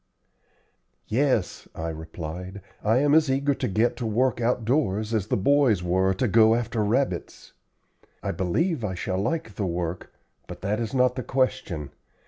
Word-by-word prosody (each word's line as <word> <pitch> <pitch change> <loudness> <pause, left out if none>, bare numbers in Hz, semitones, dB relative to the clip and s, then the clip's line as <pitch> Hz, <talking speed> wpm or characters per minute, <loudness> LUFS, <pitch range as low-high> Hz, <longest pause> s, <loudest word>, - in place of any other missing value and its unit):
"Yes," 120 -5 0
I 80 +1 -3
replied, 80 +4 -7 0.2
"I 110 +3 +3
am 145 +2 +3
as 155 -2 +5
eager 140 +2 +2
to - - -2
get 110 +5 +1
to 120 - -3
work 120 +3 +1
outdoors 115 -3 0
as 105 -3 0
the - - +1
boys 120 -3 +3
were 95 +2 +2
to 125 - 0
go 110 +1 +5
after 115 -2 -1
rabbits. 110 -4 -2 0.7
I - - -1
believe 155 - 0
I 95 -3 -2
shall 95 +1 -2
like 155 +1 -2
the 100 -1 -2
work, 85 0 -4 0.4
but - - -9
that 105 +3 -1
is 115 +2 -3
not 125 -1 +3
the - - -1
question. 100 - -1
110 Hz, 160 wpm, -25 LUFS, 95-130 Hz, 0.7 s, as